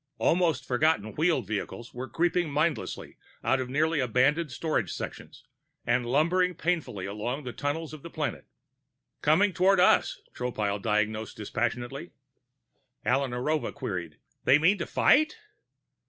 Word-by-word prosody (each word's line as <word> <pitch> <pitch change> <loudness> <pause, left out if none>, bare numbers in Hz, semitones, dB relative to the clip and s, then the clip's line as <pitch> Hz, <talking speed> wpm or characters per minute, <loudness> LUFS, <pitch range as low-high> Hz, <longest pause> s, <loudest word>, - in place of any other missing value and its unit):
Almost 165 -5 +2
forgotten 125 -5 +1
wheeled 160 - +1
vehicles 110 +3 -5
were 125 +2 -6
creeping 175 0 +1
mindlessly 150 +2 -2 0.3
out 135 - +2
of 125 - -5
nearly 155 +3 +1
abandoned 135 +5 +2
storage 125 - -1
sections - - -7 0.4
and 120 0 +1
lumbering 170 +7 +2
painfully 165 - -2
along 115 +8 -4
the 125 -2 -6
tunnels 155 +2 -3
of 155 - -9
the 170 - -9
planet. 155 -3 -4 0.7
"Coming 185 +7 +4
toward 190 +1 +4
us," 180 - +4
Tropile 105 -5 -2
diagnosed 110 +1 -1
dispassionately. 120 +8 -3 0.9
Alla 135 +2 +2
Narova 130 +5 -1
queried: 90 - -5 0.3
"They 135 - +6
mean 180 +6 +3
to 170 - -3
fight?" 310 +2 +3
140 Hz, 130 wpm, -28 LUFS, 120-165 Hz, 0.9 s, They